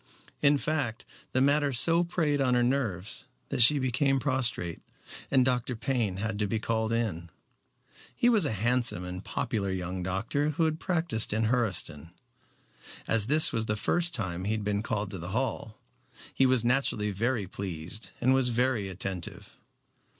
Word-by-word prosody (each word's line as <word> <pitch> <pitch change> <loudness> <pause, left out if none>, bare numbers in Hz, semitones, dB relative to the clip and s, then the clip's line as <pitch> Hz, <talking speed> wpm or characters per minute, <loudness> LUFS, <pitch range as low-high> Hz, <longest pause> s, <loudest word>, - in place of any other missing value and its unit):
In 145 0 +5
fact, 140 -6 -2 0.3
the 130 - +1
matter 145 0 +3
so 165 +7 +4
preyed 155 -5 0
on 125 -2 +2
her 120 - +3
nerves 120 -8 -2 0.2
that - - 0
she 145 +6 +8
became 135 +1 +1
prostrate, 125 - -1 0.5
and 130 -2 +4
Dr. 125 -1 0
Payne 110 -5 -1
had 105 +1 -3
to 105 - +1
be 110 - -1
called 110 0 -1
in. 100 -8 -2 0.9
He 240 - +2
was 225 -5 +5
a 145 - +2
handsome 115 -2 +1
and 90 +1 -6
popular 100 -4 -2
young 90 0 -3
doctor 105 +11 -1
who 165 - +2
had 155 0 -1
practiced 160 - +1
in 110 +1 +1
Hurseton. 90 - -1 1.0
As 110 -2 +3
this 155 +3 +3
was 110 -1 -1
the 105 - 0
first 175 +10 0
time 90 -3 -4
he 105 - 0
had 110 -1 -3
been 100 0 -1
called 105 -2 -3
to 95 - -5
the 85 +2 -6
Hall, 125 -4 -3 0.6
he 135 - +3
was 130 -2 +2
naturally 120 -5 +1
very 115 +2 -1
pleased, 95 +2 -6
and 130 +2 +3
was 130 -1 +3
very 120 -4 0
attentive. 95 -1 -6
115 Hz, 165 wpm, -28 LUFS, 100-135 Hz, 1.0 s, she